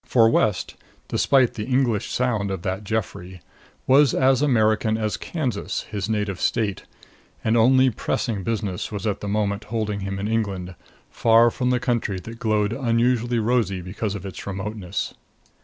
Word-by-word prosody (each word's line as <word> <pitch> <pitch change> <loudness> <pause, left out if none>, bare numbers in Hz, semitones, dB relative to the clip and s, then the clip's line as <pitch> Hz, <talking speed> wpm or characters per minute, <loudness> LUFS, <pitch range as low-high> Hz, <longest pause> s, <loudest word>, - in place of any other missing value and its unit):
For 115 -3 +4
West, 105 -4 +1 0.4
despite 130 -3 +3
the 105 - -4
English 125 -5 +1
sound 115 -6 0
of 95 -2 -4
that 95 +1 -3
Geoffrey, 95 -4 -4 0.5
was 135 0 +5
as 130 0 +3
American 110 -5 +2
as 110 -4 -1
Kansas, 125 - -3
his 100 -1 -3
native 105 -4 -2
state, 105 -6 0 0.6
and 110 +1 +2
only 130 +3 +5
pressing 110 -1 -2
business 105 -4 -3
was 105 0 -5
at 105 -2 -1
that 105 - -4
moment 100 0 -1
holding 105 -2 -2
him 95 0 -4
in 100 +1 -3
England, 100 -5 -2 0.4
far 115 +1 +4
from 125 +1 -1
the 125 -1 +2
country 120 -6 -1
that 115 +4 -10
glowed 105 -2 +1
unusually 120 -1 +1
rosy 115 -4 +1
because 100 +3 -4
of 100 -1 -7
its 95 -1 -8
remoteness. 100 -1 -4
110 Hz, 155 wpm, -23 LUFS, 100-120 Hz, 0.6 s, was